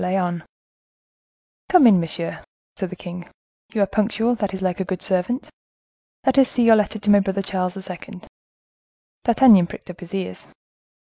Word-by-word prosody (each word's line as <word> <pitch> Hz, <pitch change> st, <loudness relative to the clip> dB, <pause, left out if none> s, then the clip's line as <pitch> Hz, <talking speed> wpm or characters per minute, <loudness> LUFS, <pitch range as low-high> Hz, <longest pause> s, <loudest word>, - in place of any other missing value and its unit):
Lyonne. 180 Hz, -3 st, -1 dB, 1.3 s
"Come 360 Hz, -7 st, +6 dB
in, 205 Hz, -6 st, +7 dB
monsieur," 165 Hz, 0 st, -4 dB, 0.3 s
said 190 Hz, -2 st, -4 dB
the 185 Hz, -, -8 dB
king; 175 Hz, -1 st, -9 dB, 0.4 s
"you 210 Hz, -, +1 dB
are -, -, +3 dB
punctual; 220 Hz, +4 st, 0 dB
that 205 Hz, -4 st, -2 dB
is 190 Hz, -, -5 dB
like 185 Hz, -1 st, -2 dB
a -, -, 0 dB
good 185 Hz, 0 st, -5 dB
servant. 190 Hz, +8 st, -1 dB, 0.8 s
Let 265 Hz, 0 st, +3 dB
us 265 Hz, -, +5 dB
see 245 Hz, -, 0 dB
your 230 Hz, -1 st, +7 dB
letter 215 Hz, 0 st, 0 dB
to 210 Hz, 0 st, +1 dB
my 205 Hz, -, +7 dB
brother 195 Hz, 0 st, -2 dB
Charles 185 Hz, -1 st, -3 dB
II." 180 Hz, +1 st, -9 dB, 1.0 s
D'Artagnan 230 Hz, -7 st, +6 dB
pricked 180 Hz, -, -10 dB
up 175 Hz, -, -16 dB
his 175 Hz, +1 st, -8 dB
ears. 185 Hz, -, -5 dB
195 Hz, 170 wpm, -21 LUFS, 180-220 Hz, 1.3 s, in